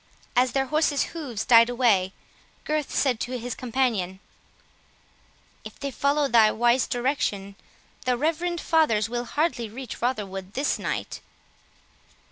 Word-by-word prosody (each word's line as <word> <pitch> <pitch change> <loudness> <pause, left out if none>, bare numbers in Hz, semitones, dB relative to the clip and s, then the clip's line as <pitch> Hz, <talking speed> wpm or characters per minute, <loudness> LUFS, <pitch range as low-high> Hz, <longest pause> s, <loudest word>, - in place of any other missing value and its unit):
As 250 0 +3
their 270 -1 +1
horses' 300 0 +1
hoofs 260 -10 -4
died 230 0 +7
away, 225 -7 +2 0.5
Gurth 305 -1 -1
said 255 -5 +1
to 250 +2 -3
his 245 0 -5
companion, 230 -7 -1 1.4
"If - - -11
they 280 -1 -4
follow 285 +2 +1
thy 225 -3 +5
wise 240 +2 +2
direction, 240 -6 -2 0.5
the 250 -1 +1
reverend 335 +5 -1
fathers 225 -12 +2
will 240 0 -3
hardly 275 -5 -1
reach 255 +4 -8
Rotherwood 200 -6 -3
this 275 +3 0
night." - - -4
245 Hz, 125 wpm, -25 LUFS, 225-280 Hz, 1.4 s, died